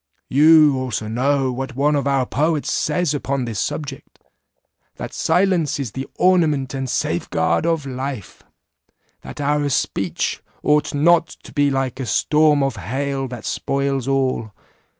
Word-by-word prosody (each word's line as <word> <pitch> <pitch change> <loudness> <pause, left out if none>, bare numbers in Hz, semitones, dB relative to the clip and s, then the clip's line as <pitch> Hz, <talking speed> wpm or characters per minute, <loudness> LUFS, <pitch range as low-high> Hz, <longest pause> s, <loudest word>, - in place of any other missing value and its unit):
You 150 -1 +6
also 120 -4 -3
know 130 +3 +1
what 130 0 -5
one 145 +3 +2
of 140 -1 0
our 135 -2 +2
poets 150 +4 0
says 175 -4 0
upon 140 -2 -2
this 110 -4 -4
subject, 140 -3 -5 0.8
'That - - -7
silence 175 -3 +1
is 130 -6 -3
the 135 +3 -5
ornament 155 -8 +2
and 135 -1 -3
safe 125 - -1
guard 80 - +1
of 165 -4 0
life'; 130 -4 -6 0.8
That - - -10
our 145 0 +1
speech 95 - -1 0.2
ought 150 0 +2
not 170 +3 +4 0.2
to - - -13
be 145 -1 +2
like 135 -2 -2
a 130 - -4
storm 150 +1 +3
of 135 -5 -1
hail 135 +6 -3
that 120 -3 -8
spoils 135 -2 -1
all. 130 -5 0
140 Hz, 150 wpm, -20 LUFS, 130-150 Hz, 0.8 s, You